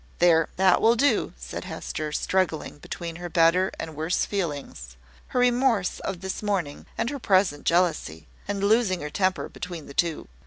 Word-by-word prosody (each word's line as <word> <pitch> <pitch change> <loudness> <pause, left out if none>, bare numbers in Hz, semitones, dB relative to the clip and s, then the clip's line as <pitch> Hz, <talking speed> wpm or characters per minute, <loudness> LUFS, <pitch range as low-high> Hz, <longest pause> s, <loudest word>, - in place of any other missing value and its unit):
"There! 165 -2 +4
that 190 -1 +4
will 230 +1 +5
do," 250 -2 +2
said - - -7
Hester, 155 -1 -5
struggling 165 -2 -1
between 165 +2 -6
her 175 0 -6
better 170 +2 +4
and 160 -1 -6
worse 160 +4 0
feelings 145 - -4 0.3
her 250 - -1
remorse 245 -6 +2
of 185 -3 -5
this 190 0 -4
morning, 195 -9 -2
and 235 - -1
her 285 - -5
present 185 - +2
jealousy 160 - +1 0.2
and 200 -1 -2
losing 205 -4 +3
her 150 0 -5
temper 185 +1 0
between 175 -4 -7
the 140 - -11
two. 165 +1 0
180 Hz, 165 wpm, -25 LUFS, 155-200 Hz, 0.3 s, will